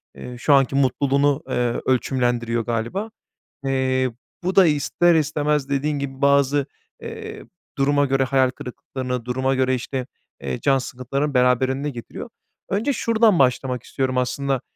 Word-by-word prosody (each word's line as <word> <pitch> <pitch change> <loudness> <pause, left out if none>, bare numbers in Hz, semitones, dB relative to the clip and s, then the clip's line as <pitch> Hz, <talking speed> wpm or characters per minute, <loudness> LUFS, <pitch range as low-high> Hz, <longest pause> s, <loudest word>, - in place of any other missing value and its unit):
eee, 125 - -8
şu 145 +4 +2
anki 135 -1 +3
mutluluğunu, 140 +1 +2
eee, 120 -1 0
ölçümlendiriyor 120 -3 0
galiba. 120 - -2 0.6
Eee, 130 -1 +1 0.3
bu 185 +1 -1
da 195 - +7
ister 165 +3 +2
istemez, 150 -2 0
dediğin 145 +1 -1
gibi, 135 -1 -6
bazı, 140 0 +3 0.4
eee, 440 -1 -8 0.3
duruma 145 +1 +2
göre 135 0 +1
hayal 130 -1 +2
kırıklıklarını, 125 -1 -6
duruma 130 +2 0
göre, 130 0 +2
işte, 130 +1 -4 0.3
eee, 65 -2 -4
can 135 -1 +3
sıkıntılarını, 135 +3 -3
beraberinde 130 +2 +2
getiriyor. 120 -4 -8 0.4
Önce 220 +8 0
şuradan 225 -6 +3
başlamak 125 -1 +1
istiyorum 130 -1 -2
aslında. 130 +1 -1
135 Hz, 135 wpm, -22 LUFS, 125-145 Hz, 0.6 s, da